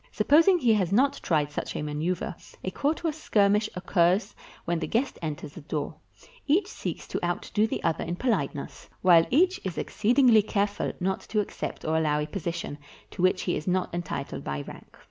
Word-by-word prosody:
Supposing 320 Hz, -, +5 dB
he 240 Hz, -8 st, +3 dB
has 190 Hz, -4 st, +1 dB
not 275 Hz, +7 st, +3 dB
tried 150 Hz, -3 st, +1 dB
such -, -, -4 dB
a -, -, -2 dB
maneuver, 155 Hz, +5 st, -2 dB, 0.3 s
a 185 Hz, -, -2 dB
courteous 315 Hz, -, -1 dB
skirmish 210 Hz, -1 st, +3 dB
occurs 180 Hz, +2 st, +2 dB, 0.3 s
when 170 Hz, -1 st, 0 dB
the -, -, -3 dB
guest 255 Hz, +4 st, -1 dB
enters 155 Hz, -2 st, -5 dB
the 170 Hz, -, -9 dB
door; 150 Hz, 0 st, -3 dB, 0.5 s
each 330 Hz, +8 st, +3 dB
seeks -, -, -6 dB
to -, -, -3 dB
outdo 175 Hz, +5 st, 0 dB
the -, -, -4 dB
other 160 Hz, -, 0 dB
in 170 Hz, +1 st, -3 dB
poHteness, 175 Hz, -, -2 dB
while 170 Hz, -3 st, +6 dB
each 365 Hz, +7 st, +3 dB
is 185 Hz, -3 st, -4 dB
exceedingly 235 Hz, 0 st, +4 dB
careful 205 Hz, -1 st, -1 dB
not 190 Hz, +1 st, 0 dB
to 215 Hz, -, +1 dB
ac 210 Hz, -, -2 dB
cept -, -, -5 dB
or 160 Hz, +1 st, +1 dB
allow 150 Hz, -2 st, +2 dB
a 150 Hz, -, -1 dB
position 170 Hz, -2 st, -4 dB, 0.3 s
to -, -, -6 dB
which 185 Hz, 0 st, +3 dB
he 175 Hz, -, 0 dB
is 155 Hz, -, -5 dB
not 185 Hz, -1 st, 0 dB
entitled 165 Hz, -5 st, -4 dB
by 70 Hz, 0 st, -3 dB
rank. -, -, -12 dB
185 Hz, 185 wpm, -27 LUFS, 165-225 Hz, 0.5 s, while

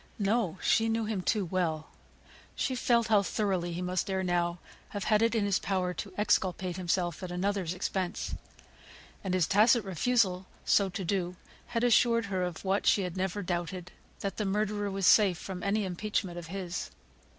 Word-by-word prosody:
No! 205 Hz, -3 st, 0 dB
she 225 Hz, 0 st, +3 dB
knew 225 Hz, 0 st, 0 dB
him 210 Hz, -3 st, -2 dB
too 205 Hz, +1 st, +1 dB
well. 165 Hz, -3 st, -2 dB, 0.6 s
She 260 Hz, -, -1 dB
felt 235 Hz, -2 st, +2 dB
how 210 Hz, -2 st, +5 dB
thoroughly 190 Hz, -3 st, -1 dB
he 175 Hz, +2 st, -3 dB
must 180 Hz, +1 st, -1 dB
ere 190 Hz, 0 st, 0 dB
now 175 Hz, -1 st, 0 dB, 0.3 s
have 205 Hz, -2 st, -4 dB
had 215 Hz, -1 st, +3 dB
it 230 Hz, 0 st, +2 dB
in 215 Hz, -2 st, +2 dB
his 200 Hz, -2 st, +2 dB
power 185 Hz, -2 st, -1 dB
to 195 Hz, +3 st, -6 dB
exculpate 185 Hz, -3 st, +1 dB
himself 175 Hz, -2 st, -1 dB
at 185 Hz, -, -5 dB
another's 185 Hz, -1 st, -1 dB
expense. 185 Hz, -1 st, -2 dB, 0.9 s
And 185 Hz, -2 st, -1 dB
his 180 Hz, -3 st, +3 dB
tacit 215 Hz, +2 st, +4 dB
refusal 190 Hz, -1 st, +1 dB, 0.2 s
so 200 Hz, -2 st, +4 dB
to 190 Hz, 0 st, -5 dB
do 180 Hz, -1 st, -1 dB, 0.3 s
had 235 Hz, -1 st, -1 dB
assured 235 Hz, -1 st, +4 dB
her 185 Hz, -, 0 dB
of 180 Hz, 0 st, -4 dB
what 195 Hz, +1 st, +1 dB
she 200 Hz, -, +4 dB
had 180 Hz, -1 st, -4 dB
never 190 Hz, +2 st, -2 dB
doubted, 175 Hz, 0 st, -3 dB, 0.3 s
that 200 Hz, -, -3 dB
the 215 Hz, -, 0 dB
murderer 205 Hz, +1 st, 0 dB
was 195 Hz, -1 st, -2 dB
safe 195 Hz, -4 st, +6 dB
from 185 Hz, +1 st, -6 dB
any 200 Hz, +2 st, 0 dB
impeachment 185 Hz, -1 st, -2 dB
of 165 Hz, -, -9 dB
his. 180 Hz, -1 st, -4 dB
190 Hz, 180 wpm, -30 LUFS, 180-210 Hz, 0.9 s, safe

